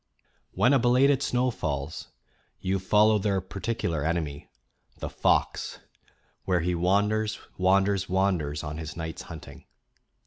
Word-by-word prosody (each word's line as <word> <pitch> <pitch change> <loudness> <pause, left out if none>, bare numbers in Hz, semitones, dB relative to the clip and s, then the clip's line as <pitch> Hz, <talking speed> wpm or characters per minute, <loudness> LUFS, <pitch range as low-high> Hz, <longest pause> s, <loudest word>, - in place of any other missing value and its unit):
When 115 +9 +3
a 135 - +5
belated 130 +3 +4
snow 125 -1 +1
falls, 75 -6 -4 0.5
you 95 +1 -1
follow 105 +3 +4
their 100 -1 +1
particular 95 -4 -3
enemy, 80 -3 -2 0.5
the - - -5
fox, - - 0 0.7
where 90 -2 +1
he 90 +2 0
wanders, 105 +5 +1 0.2
wanders, 95 +1 +2
wander's 90 -6 0
on 75 +1 -5
his 80 -1 -7
night's 80 0 -5
hunting. 70 -5 -11
95 Hz, 125 wpm, -27 LUFS, 80-105 Hz, 0.7 s, a